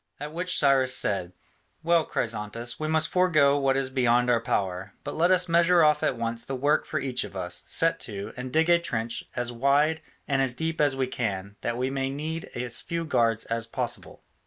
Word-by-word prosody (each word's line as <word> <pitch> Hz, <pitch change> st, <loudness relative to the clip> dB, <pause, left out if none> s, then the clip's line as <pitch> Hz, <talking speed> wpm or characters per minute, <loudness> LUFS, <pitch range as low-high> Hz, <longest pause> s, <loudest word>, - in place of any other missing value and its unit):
At 150 Hz, +1 st, -6 dB
which 180 Hz, +2 st, -2 dB
Cyrus 135 Hz, -2 st, +3 dB
said, 95 Hz, -3 st, -1 dB, 0.5 s
"Well, 170 Hz, -1 st, +3 dB
Chrysantas, 115 Hz, +1 st, -3 dB
we 155 Hz, -, -2 dB
must 160 Hz, 0 st, +4 dB
forego 150 Hz, -6 st, +3 dB
what 135 Hz, -1 st, +2 dB
is 135 Hz, -1 st, -1 dB
beyond 125 Hz, -1 st, +2 dB
our 115 Hz, -2 st, +2 dB
power: 95 Hz, -4 st, -2 dB
but 145 Hz, -, -5 dB
let 170 Hz, +3 st, +2 dB
us 180 Hz, -1 st, +4 dB
measure 170 Hz, 0 st, +4 dB
off 150 Hz, -1 st, +4 dB
at 125 Hz, -, 0 dB
once 115 Hz, 0 st, -2 dB
the 135 Hz, -, -4 dB
work 145 Hz, +4 st, +1 dB
for 155 Hz, -, -2 dB
each 130 Hz, -2 st, -1 dB
of -, -, -9 dB
us, 90 Hz, -1 st, -3 dB
set 165 Hz, 0 st, +2 dB
to, 100 Hz, -1 st, -7 dB
and 125 Hz, 0 st, -6 dB
dig 160 Hz, +4 st, +2 dB
a 170 Hz, 0 st, +5 dB
trench 115 Hz, -8 st, -3 dB
as 120 Hz, 0 st, -1 dB
wide 140 Hz, +6 st, +2 dB, 0.3 s
and 135 Hz, -2 st, +1 dB
as 130 Hz, -2 st, 0 dB
deep 160 Hz, +3 st, -2 dB
as 145 Hz, -2 st, +3 dB
we 135 Hz, -1 st, 0 dB
can, 100 Hz, -5 st, -4 dB
that 120 Hz, 0 st, -2 dB
we 130 Hz, +2 st, -1 dB
may 135 Hz, -1 st, -1 dB
need 155 Hz, +4 st, -4 dB
as 120 Hz, 0 st, -3 dB
few 170 Hz, 0 st, -4 dB
guards 115 Hz, -7 st, +1 dB
as 115 Hz, 0 st, -2 dB
possible." -, -, -3 dB
135 Hz, 205 wpm, -26 LUFS, 115-155 Hz, 0.5 s, a